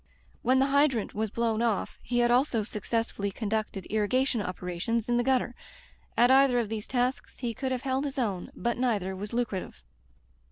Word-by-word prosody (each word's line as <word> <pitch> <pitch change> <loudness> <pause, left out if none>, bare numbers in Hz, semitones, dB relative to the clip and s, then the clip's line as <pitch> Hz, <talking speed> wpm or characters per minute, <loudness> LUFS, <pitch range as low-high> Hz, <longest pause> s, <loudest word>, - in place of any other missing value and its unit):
When 255 +2 +3
the 265 - +4
hydrant 275 -5 +2
was 220 +1 -1
blown 230 +1 0
off, 230 -4 -1
he 245 - -2
had 240 0 +4
also 245 -3 +3
successfully 210 -1 -2
conducted 210 -2 -3
irrigation 230 +3 +1
operations 180 +5 -2
in 240 0 +2
the 240 - +2
gutter. 255 -1 +1 0.6
At 245 +2 +6
either 265 -2 +6
of 230 -3 0
these 215 -1 -4
tasks 250 +1 -1
he 240 -2 -3
could 260 +3 -3
have 255 -1 -2
held 265 +1 0
his 280 0 -4
own, 205 -8 -1
but 235 0 -1
neither 205 -7 0
was 200 +2 -6
lucrative. 215 - -3
235 Hz, 175 wpm, -28 LUFS, 210-255 Hz, 0.6 s, At